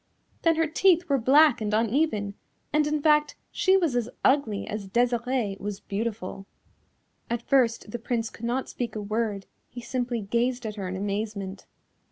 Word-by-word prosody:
Then 330 Hz, -1 st, +3 dB
her 325 Hz, 0 st, +2 dB
teeth 345 Hz, +2 st, +3 dB
were 280 Hz, -3 st, +2 dB
black 275 Hz, +2 st, +5 dB
and 210 Hz, 0 st, 0 dB
uneven, 225 Hz, -3 st, +1 dB, 0.4 s
and, 300 Hz, 0 st, +3 dB
in 300 Hz, -1 st, -1 dB
fact, 300 Hz, -1 st, +3 dB, 0.2 s
she 385 Hz, -2 st, +3 dB
was 335 Hz, -9 st, +1 dB
as 240 Hz, -1 st, 0 dB, 0.2 s
ugly 260 Hz, -7 st, +2 dB
as 205 Hz, -2 st, -5 dB
Desirée 240 Hz, -1 st, 0 dB
was 205 Hz, -1 st, -5 dB
beautiful. 200 Hz, -2 st, -4 dB, 0.8 s
At 235 Hz, 0 st, -2 dB
first 235 Hz, -5 st, +2 dB
the 240 Hz, -, -4 dB
Prince 230 Hz, -1 st, -2 dB
could 230 Hz, -, -8 dB
not 250 Hz, +3 st, -1 dB
speak 235 Hz, -3 st, -4 dB
a -, -, -2 dB
word, 210 Hz, -1 st, -2 dB, 0.2 s
he 250 Hz, -, -8 dB
simply 245 Hz, -1 st, -2 dB
gazed 240 Hz, +4 st, -1 dB
at 215 Hz, -, -3 dB
her 200 Hz, -3 st, -5 dB
in 185 Hz, -, -4 dB
amazement. 200 Hz, -1 st, -4 dB
235 Hz, 170 wpm, -26 LUFS, 210-275 Hz, 0.8 s, black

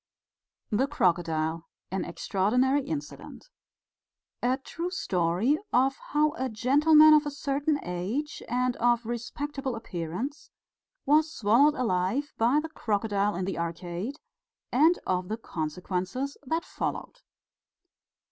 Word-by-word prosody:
THE 245 Hz, +6 st, +2 dB
CROCODILE 165 Hz, -, 0 dB, 0.2 s
AN 190 Hz, 0 st, -2 dB
EXTRAORDINARY 250 Hz, +8 st, +1 dB
INCIDENT 315 Hz, +10 st, -7 dB, 0.9 s
_A 260 Hz, +2 st, 0 dB
true 345 Hz, +1 st, -4 dB
story 195 Hz, -, +1 dB
of 265 Hz, +2 st, +3 dB
how 300 Hz, +1 st, +1 dB
a 260 Hz, 0 st, -1 dB
gentleman 300 Hz, +7 st, +6 dB
of 300 Hz, 0 st, +4 dB
a -, -, 0 dB
certain 285 Hz, +1 st, -1 dB
age 200 Hz, +13 st, -3 dB
and 250 Hz, 0 st, +1 dB
of 240 Hz, 0 st, +2 dB
respectable 265 Hz, +3 st, -4 dB
appearance 190 Hz, -, -5 dB, 0.6 s
was 305 Hz, +2 st, +4 dB
swallowed 260 Hz, +6 st, +4 dB
alive 230 Hz, +4 st, 0 dB
by 240 Hz, +6 st, +4 dB
the 320 Hz, +1 st, -5 dB
crocodile 205 Hz, -, 0 dB
in 180 Hz, +1 st, -2 dB
the 190 Hz, -2 st, -3 dB
Arcade, 175 Hz, -, -4 dB, 0.6 s
and 315 Hz, +7 st, +5 dB
of 180 Hz, -1 st, -1 dB
the 220 Hz, -, -3 dB
consequences 180 Hz, -, -3 dB
that 325 Hz, +4 st, -1 dB
followed. -, -, -4 dB
245 Hz, 115 wpm, -28 LUFS, 185-290 Hz, 0.9 s, gentleman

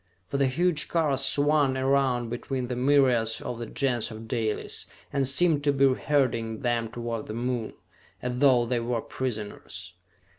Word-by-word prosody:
For 140 Hz, -, -1 dB
the 140 Hz, -1 st, +3 dB
huge 160 Hz, +2 st, +1 dB
cars 150 Hz, -5 st, +1 dB
swung 145 Hz, -1 st, +2 dB
around 130 Hz, -3 st, +1 dB
between 125 Hz, +1 st, -3 dB
the 125 Hz, -, -2 dB
myriads 125 Hz, -4 st, +3 dB
of 120 Hz, -, -5 dB
the 120 Hz, -, -5 dB
Gens 125 Hz, -2 st, 0 dB
of 110 Hz, 0 st, -9 dB
Dalis, 110 Hz, -1 st, -1 dB, 0.3 s
and 140 Hz, -2 st, +2 dB
seemed 145 Hz, +1 st, +3 dB
to 145 Hz, -, +4 dB
be 135 Hz, -1 st, +4 dB
herding 115 Hz, -6 st, 0 dB
them 120 Hz, -3 st, 0 dB
toward 115 Hz, -1 st, -5 dB
the 110 Hz, -, -5 dB
Moon, 120 Hz, -1 st, -2 dB, 0.5 s
as 125 Hz, 0 st, -3 dB
though 130 Hz, -4 st, +5 dB
they 120 Hz, 0 st, 0 dB
were 115 Hz, 0 st, -1 dB
prisoners. 105 Hz, -7 st, -6 dB
125 Hz, 160 wpm, -27 LUFS, 115-140 Hz, 0.5 s, though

